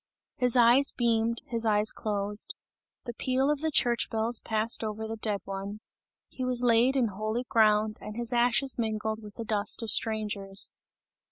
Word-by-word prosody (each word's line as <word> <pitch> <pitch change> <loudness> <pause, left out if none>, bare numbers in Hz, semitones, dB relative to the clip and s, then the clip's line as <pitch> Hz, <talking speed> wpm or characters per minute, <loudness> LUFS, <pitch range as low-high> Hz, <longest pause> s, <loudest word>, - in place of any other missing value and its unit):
His 250 0 +3
eyes 245 +4 +5
beamed, 230 -1 +1
his 230 -2 -1
eyes 210 -1 +2
closed. 205 -1 -3 0.5
The 240 - -5
peal 260 +4 0
of 300 - -1
the 320 - 0
church 240 -5 +2
bells 225 +1 0
passed 220 +1 -1
over 220 0 -4
the 225 - -4
dead 210 -3 -2
one. 195 +2 -6 0.5
He 260 - -7
was 250 -1 +1
laid 245 +2 +4
in 245 -4 +2
holy 215 +4 -3
ground 215 -2 +2
and 210 - -8
his 240 +1 -2
ashes 245 +3 +2
mingled 220 -1 -2
with 210 -1 -12
the 230 - -6
dust 210 +2 0
of 225 - -1
strangers. 205 -3 -1
225 Hz, 170 wpm, -28 LUFS, 215-240 Hz, 0.5 s, eyes